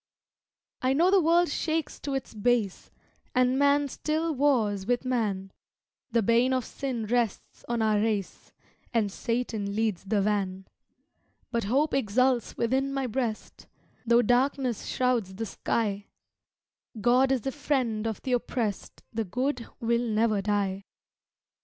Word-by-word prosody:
I 260 0 +2
know 340 +6 +4
the 390 -1 +5
world 340 +2 +4
shakes 315 0 -2
to 280 -1 -3
its 270 - -4
base, 220 -2 0 0.5
And 255 +1 +3
man 285 0 +4
still 315 +4 -1
wars 225 -9 +1
with 245 +1 0
man, 205 -7 -1 0.6
The 230 -2 +2
bane 235 +4 +3
of 255 -3 0
sin 255 -5 -4
rests 235 -2 -2
on 235 -2 0
our 215 -1 +3
race, 210 -3 -2 0.4
And 220 -4 +1
Satan 220 -3 -2
leads 215 -4 -1
the 205 +1 +1
van; 195 -2 -1 0.9
But 235 -4 -1
hope 275 +9 +1
exults 255 0 +1
within 265 +4 +1
my 275 -1 -1
breast 235 -2 -4 0.4
Tho 235 0 +4
'darkness 250 0 +1
shrouds 240 -7 0
the 225 +3 -3
sky; 205 -1 -2 0.9
God 250 +5 +4
is 260 -3 +1
the 270 - -2
friend 255 -7 -1
of 220 -3 -4
the 260 - -3
oppressed, 230 -3 -2
The 225 0 -1
good 250 +4 -2
will 235 +1 +1
never 215 -1 +2
die. 200 -1 -1
235 Hz, 140 wpm, -27 LUFS, 210-265 Hz, 0.9 s, the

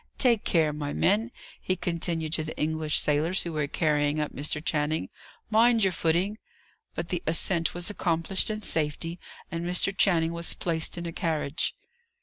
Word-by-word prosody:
Take 235 -4 +3
care, 160 -3 +2
my 145 -1 -4
men!" 215 +4 +2 0.3
he 185 - 0
continued 170 -2 -2
to 160 - +1
the 155 - -7
English 155 0 0
sailors, 155 +5 +1
who 170 - -5
were 150 -2 -1
carrying 150 -1 +1
up 150 - -2
Mr. 150 +2 0
Channing. 155 0 -1 0.4
"Mind 230 0 +5
your 190 -2 +3
footing." 175 +6 0 0.6
But 170 - -4
the 175 -2 -2
ascent 165 +1 +1
was 175 +3 -3
accomplished 175 0 0
in 215 0 -3
safety, 165 +1 -1 0.3
and 165 +1 -3
Mr. 180 +3 +1
Channing 165 -5 +3
was 170 0 0
placed 165 0 -1
in 170 - -4
a 165 - -5
carriage. 160 -3 -1
165 Hz, 165 wpm, -27 LUFS, 155-180 Hz, 0.6 s, Mind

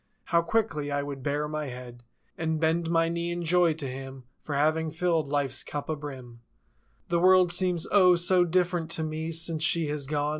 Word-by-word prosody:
How 170 -1 +2
quickly 170 -6 -1
I 145 0 -1
would 140 -1 -6
bare 145 +2 -1
my 155 -1 -4
head 125 -1 -9 0.3
And 160 -1 -2
bend 165 +1 0
my 165 -1 +2
knee 170 +1 -2
in 175 0 -4
joy 175 0 +3
to 150 -3 -5
Him 135 0 -8 0.2
For 145 - -5
having 155 +2 +1
filled 165 -2 0
Life's 140 -2 -1
cup 145 +1 -6
a 155 - 0
brim. 130 -5 -9 0.7
The 170 0 +1
world 185 0 +5
seems 180 -2 +1
O, 185 -3 +6
so 175 +1 +4
different 175 -1 0
to 160 - -2
me 155 +1 -4
Since 165 -1 -1
she 165 -2 +2
has 145 -2 -3
gone. 145 0 -1
160 Hz, 195 wpm, -27 LUFS, 145-170 Hz, 0.7 s, O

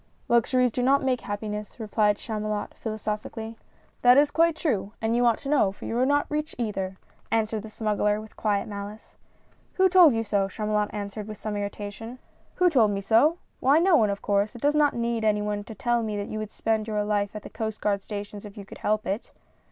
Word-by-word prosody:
"Luxuries 245 +1 +3
do 250 - -2
not 270 +3 +3
make 255 -2 +1
happiness," 210 +1 -5
replied 210 -1 +1
Chamu 215 -1 -4
lot, 210 -1 -3
philosophically. 220 +1 -5 0.2
" - - -36
That 245 +1 +7
is 290 0 +5
quite 330 +1 +3
true, 220 - -1
and 225 +1 0
you 245 0 +3
ought 230 - +3
to 280 - -7
know, 275 -10 +3
for 195 - -11
you - - -3
are 255 - +3
not 285 +1 +2
rich 300 +1 -3
either! 195 -5 -3 0.2
" - - -35
answered 220 -1 0
the 220 - -9
Smuggler, 210 -1 0
with 215 0 -11
quiet 205 -2 0
malice. 205 +1 -8 0.3
" - - -36
Who 380 0 +5
told 360 -6 +7
you 225 - 0
so? 200 -2 +1
" - - -12
Chamulot 210 0 -1
answered 205 0 -5
with 215 -1 -7
some 215 -1 -4
irritation. 205 +3 -5 0.2
" - - -35
Who 360 - +4
told 250 -11 +4
me 200 -1 -2
so? 235 - +4 0.2
Why, 275 +3 +4
no 350 +1 +5
one, 215 -8 +4
of 200 0 -3
course. 205 +2 +1
It 240 - -9
does 290 +1 +4
not 300 -1 +3
need 235 -1 -1
any 210 -1 +2
one 205 0 -2
to 220 - -9
tell 240 +3 +1
me 215 -2 -3
that 205 - -4
you 215 - -4
would 215 -1 -4
spend 220 0 -1
your 210 -1 0
life 205 0 -1
at 210 - -6
the - - -9
Coast 220 -1 -4
Guard 200 -1 0
stations 205 0 -7
if 210 0 -11
you 200 - -8
could - - -12
help 215 0 0
it." 200 +5 -3
215 Hz, 235 wpm, -26 LUFS, 205-240 Hz, 0.3 s, That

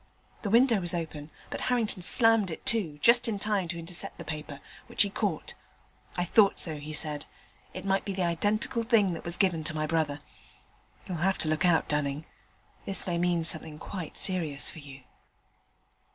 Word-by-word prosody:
The 205 - -3
window 235 0 +4
was 175 0 +2
open, 160 -3 -5 0.2
but - - -5
Harrington 230 -6 0
slammed 225 +1 +5
it 160 - -8
to, 185 -10 +2
just 240 +1 +6
in 220 -3 -1
time 200 -3 -1
to 170 +1 -5
intercept 170 +1 -3
the - - -9
paper, 150 -2 -6 0.3
which - - +3
he 200 - -3
caught. 195 -7 -2 0.6
'I 175 - 0
thought 200 +3 +4
so,' 155 -3 +2
he 150 +1 -8
said; 150 -1 +1 0.5
'it 185 +1 -7
might 195 0 +1
be 200 - -4
the 190 -1 -1
identical 205 +7 0
thing 225 -5 +2
that 165 - -7
was 170 0 -3
given 175 -5 +1
to 155 0 +1
my 155 0 -1
brother. 155 -2 -1 0.9
You'll 180 - -4
have 190 +4 +1
to 155 - 0
look 155 +3 +1
out, 165 -2 +2
Dunning; 150 0 -1 0.6
this 195 - -3
may 170 -2 -1
mean 175 -1 +1
something 155 -1 -1
quite 170 0 -7
serious 165 -7 0
for 160 - -11
you.' 140 -2 -12
175 Hz, 185 wpm, -28 LUFS, 155-200 Hz, 0.9 s, just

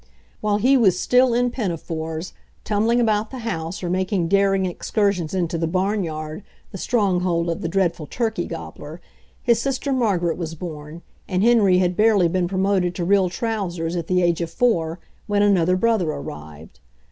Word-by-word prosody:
While 210 -1 +1
he 260 +6 +4
was 190 -7 +3
still 250 0 +3
in 245 0 +1
pinafores, 165 -6 -4 0.3
tumbling 220 +3 +1
about 215 -2 +1
the 265 - -8
house 165 -4 -4
or - - -2
making 185 -2 0
daring 195 0 +3
excursions 185 -1 -1
into 170 -2 -1
the 165 - 0
barnyard, 170 -4 -2 0.3
the 195 - -7
strong 200 -6 +1
hold 170 -2 0
of 165 - -4
the - - -2
dreadful 170 -3 0
turkey 225 - -2
gobbler, - - -8 0.4
his 235 -2 +3
sister, 275 +1 -1
Margaret, 190 -10 0
was 165 -1 -4
born, 155 -1 -8 0.2
and 185 0 0
Henry 215 -6 +5
had 180 -1 +1
barely 210 -4 +4
been 175 +1 0
promoted 185 -1 0
to 175 - -2
real 190 0 +3
trousers, 180 -5 -3
at 170 -2 -3
the 180 -1 +2
age 170 -1 +1
of 170 - -2
four, 165 -7 0 0.3
when 205 -1 +2
another 185 -3 +3
brother 220 -5 +1
arrived. 75 - -8
185 Hz, 170 wpm, -22 LUFS, 170-210 Hz, 0.4 s, Henry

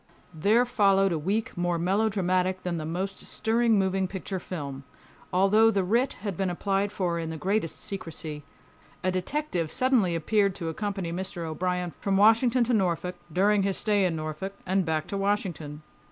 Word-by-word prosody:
There 210 +10 +3
followed 195 -4 +3
a 165 - 0
week 210 +9 -1
more 175 -1 0
melodramatic 185 -1 +1
than 175 -2 -2
the 155 -1 -4
most 185 +4 -3
stirring 225 0 +1
moving 190 -1 +1
picture 190 0 -5
film. 140 -7 -6 0.5
Although 200 +4 +5
the 200 -4 +1
writ 235 +8 +1
had 200 -4 -2
been 190 +1 -1
applied 195 +3 0
for 175 -4 -1
in 165 -1 -3
the 160 - -5
greatest 190 +1 -1
secrecy, 160 -5 -5 0.6
a 185 - +2
detective 185 - -2
suddenly 250 - +2
appeared 200 +4 +1
to 165 -3 -3
accompany 195 0 -3
Mr. 180 -2 -4
O'Brien 180 +2 -2
from 195 -1 +1
Washington 230 +4 +5
to 240 +1 0
Norfolk, 180 -3 0
during 200 +4 +3
his 195 -1 0
stay 205 -2 +2
in 175 -3 +1
Norfolk, 155 +5 -5
and 190 0 +1
back 155 -2 -1
to 200 - -4
Washington. 175 -7 -2
190 Hz, 170 wpm, -27 LUFS, 170-205 Hz, 0.6 s, Although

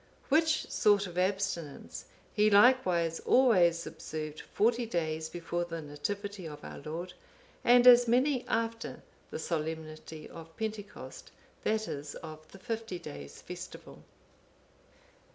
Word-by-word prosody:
Which 310 +2 +3
sort 205 -1 +4
of 175 -2 -8
abstinence 185 -5 -2 0.3
he 210 +1 +4
likewise 195 -7 +4
always 180 -10 +4
observed 155 -1 -6
forty 235 +2 +2
days 160 -5 -2
before 175 0 -3
the 165 -1 -5
Nativity 190 +6 -5
of 150 -1 -9
our - - -8
Lord, 165 +5 -6 0.5
and 245 0 +6
as 245 -1 +9
many 255 +2 +3
after 230 0 -2 0.3
the - - -5
solemnity 160 -1 -4
of 165 0 -12
Pentecost, 215 -2 -6 0.3
that 220 0 0
is, 145 0 -5
of 155 -1 -10
the - - -12
fifty 225 -2 -4
days' 70 - -9
festival. - - -9
180 Hz, 120 wpm, -31 LUFS, 160-225 Hz, 0.5 s, as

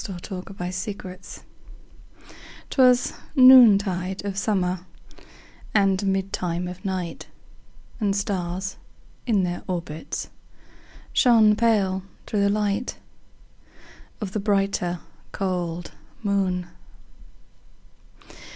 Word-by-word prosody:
1827 185 0 -6
Evening 185 - -18
Star - - -17 0.4
'Twas 250 -2 +4 0.2
noontide 200 -8 +6
of 200 -1 -3
summer, 185 -3 -1 0.9
And 195 -2 +3
midtime 190 -3 -1
of 180 +1 -8
night, 185 -3 -4 0.7
And 200 -3 +1
stars, 190 -1 -3 0.5
in 210 -5 +3
their 175 0 -2
orbits, 170 -4 -5 0.8
Shone 220 -4 +5
pale, 205 -4 +2 0.2
through 210 - -1
the 200 - +3
light 210 +3 -1 1.2
Of 205 -3 -4
the 215 - -2
brighter, 195 -4 0 0.3
cold 175 -3 -3 0.3
moon. 190 -3 0
195 Hz, 85 wpm, -24 LUFS, 180-205 Hz, 1.2 s, noontide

